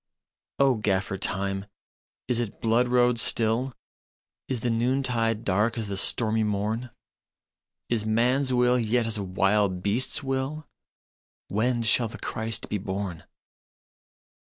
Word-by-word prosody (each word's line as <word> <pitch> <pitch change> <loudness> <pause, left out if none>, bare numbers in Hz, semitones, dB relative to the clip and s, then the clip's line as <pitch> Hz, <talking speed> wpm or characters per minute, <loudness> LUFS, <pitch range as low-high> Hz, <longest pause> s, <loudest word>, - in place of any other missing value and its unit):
" - - -60
O 135 - +4
Gaffer 100 -1 -1
Time, 95 0 -1 0.6
is 120 -1 +1
it 115 -4 -4
blood 115 +2 +2
road 125 -1 +3
still? 115 +2 +2 0.8
Is 130 -4 -2
the 120 - 0
noontide 115 -2 0
dark 105 +5 +1
as 110 -3 -2
the 100 - -3
stormy 110 +2 +1
morn? 105 +4 -2 1.0
Is 115 -3 0
man 120 +5 +1
s 135 -2 +1
will 125 0 +3
yet 115 +1 +1
as 110 -1 +1
a - - -3
wild 95 0 0
beast 115 +6 +2
s - - -5
will? 135 +3 -3 0.8
When 120 +3 0
shall 115 +1 +3
the 110 - -9
Christ 110 0 -2
be 105 - -3
born? 95 -3 -5
115 Hz, 140 wpm, -26 LUFS, 105-125 Hz, 1.0 s, O